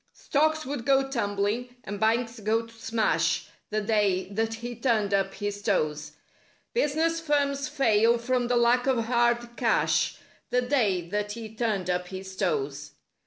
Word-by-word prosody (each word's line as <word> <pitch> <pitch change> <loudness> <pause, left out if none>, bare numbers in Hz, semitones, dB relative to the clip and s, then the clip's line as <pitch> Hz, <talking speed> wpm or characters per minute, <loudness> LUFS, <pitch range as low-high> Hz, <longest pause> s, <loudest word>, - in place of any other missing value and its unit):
Stocks 310 +2 +1
would 270 -2 -4
go 270 +1 +3
tumbling 230 0 -1
and 205 +1 -6
banks 230 +1 +1
go 220 +2 0
to 230 - -16
smash— 225 -1 0 0.2
The 215 0 -1
day 205 -4 +1
that 225 +2 -1
he 240 +1 -6
turned 225 -4 +1
up 195 0 +1
his 205 0 -4
toes; 155 -7 -1 0.6
Business 330 - +1
firms 285 -2 0
fail 235 -5 +3
from 245 +1 0
the 245 0 +2
lack 240 +2 +3
of 245 -4 +2
hard 240 0 +1
cash— - - +2 0.3
The 250 +1 +1
day 210 -10 +1
that 205 +1 -2
he 220 -1 -8
turned 215 -5 -1
up 180 0 -2
his 190 0 -8
toes. 145 -6 -2
225 Hz, 155 wpm, -27 LUFS, 205-250 Hz, 0.6 s, go